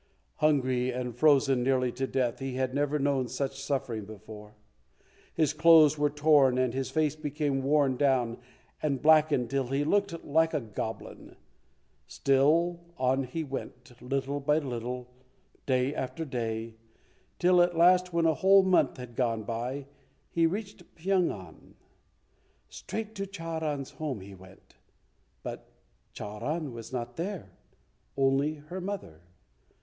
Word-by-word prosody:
Hungry, 130 -4 +2
and 125 -1 -4
frozen 135 -2 +4
nearly 130 -1 +1
to 130 +2 -3
death, 125 -3 -1
he 135 -1 -4
had 130 0 -1
never 145 +1 0
known 140 -3 0
such 135 +2 -4
suffering 130 -6 -2
before. 105 0 -11 0.8
His 155 -2 +2
clothes 155 -1 +6
were 145 -1 +1
torn 145 -3 +4
and 130 -2 +1
his 130 -1 -2
face 155 +1 +1
became 145 -2 -2
worn 140 -1 +2
down 125 -4 +1 0.4
and 140 -3 0
blackened 150 -4 +4
till 135 -2 0
he 135 +3 0
looked 200 +1 0
like 160 +2 +2
a - - +2
goblin. 110 -1 -7 0.7
Still 155 +6 +2 0.2
on 130 +1 +1
he 160 +6 -4
went, 130 -3 -8
little 135 +2 -2
by 150 +2 +2
little, 125 -3 -4 0.6
day 130 +1 +1
after 155 +4 -4
day, 115 -4 -4 0.6
till 180 0 +4
at 175 -1 +2
last, 180 +1 +5
when 170 -1 +1
a 160 - +4
whole 195 +4 +5
month 185 -5 +2
had 125 -2 -9
gone 115 -3 0
by, 120 +5 -4 0.5
he 165 -1 +3
reached 195 0 -6
Pyong 185 +1 +1
an. 95 -2 -10 0.9
Straight 220 -1 -6
to 195 -2 -4
Charan's 160 -6 -4
home 140 -9 -4
he 100 +1 -11
went, 95 0 -17 0.7
but - - -7 0.4
Charan 130 +8 -4
was 115 0 -9
not 120 -1 -5
there, 190 +2 -5 0.7
only 135 +3 +2
her 155 +5 -8
mother. 180 - -6
140 Hz, 140 wpm, -29 LUFS, 125-160 Hz, 0.9 s, clothes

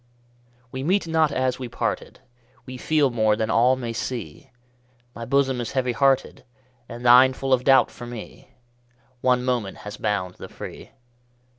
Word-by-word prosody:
We 130 - -5
meet 180 +5 +1
not 160 -2 +2
as 130 -2 -1
we 130 - -5
parted, 120 - -4 0.4
We 130 - -8
feel 145 +1 +1
more 110 -2 +2
than 110 0 -2
all 125 +3 +4
may 120 -3 -5
see; 115 -9 -6 0.6
My 115 - -7
bosom 135 -1 +1
is 115 - -5
heavy 130 -2 0
hearted, 135 +1 +1 0.5
And 120 +1 -8
thine 125 +2 +7
full 135 0 -1
of 125 -1 +2
doubt 135 0 +4
for 120 - -10
me: 120 -2 -10 0.7
One 125 -1 +2
moment 120 -6 -2
has 105 0 -7
bound 100 -4 -2
the - - -9
free. - - -10
125 Hz, 160 wpm, -23 LUFS, 115-130 Hz, 0.7 s, thine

